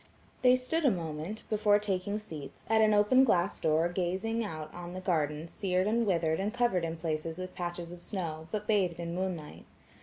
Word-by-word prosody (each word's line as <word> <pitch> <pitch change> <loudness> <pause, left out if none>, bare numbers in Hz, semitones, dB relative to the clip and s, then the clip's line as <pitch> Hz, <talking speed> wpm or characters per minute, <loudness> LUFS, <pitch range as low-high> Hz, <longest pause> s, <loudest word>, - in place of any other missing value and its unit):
They 250 0 +6
stood 255 +6 -1
a 280 - +6
moment, 170 +1 -4
before 210 -1 +4
taking 200 -1 -1
seats, 160 -10 -8
at 220 0 +4
an 215 -1 +5
open 210 +6 +5
glass 190 -6 +2
door 160 +2 +3
gazing 190 +6 -1
out 155 -6 -6
on 175 0 -7
the - - -3
gardens 160 -3 -1
sered 185 -1 0
and 230 +1 +2
withered 165 -4 +1
and 200 +2 0
covered 240 -7 +1
in 165 0 -4
places 160 0 -3
with 185 0 -6
patches 175 -1 -5
of 175 0 -10
snow, 160 -5 -4
but 210 -1 -2
bathed 190 -6 +1
in 170 0 -3
moonlight. 180 -4 -4
185 Hz, 190 wpm, -31 LUFS, 165-210 Hz, -, They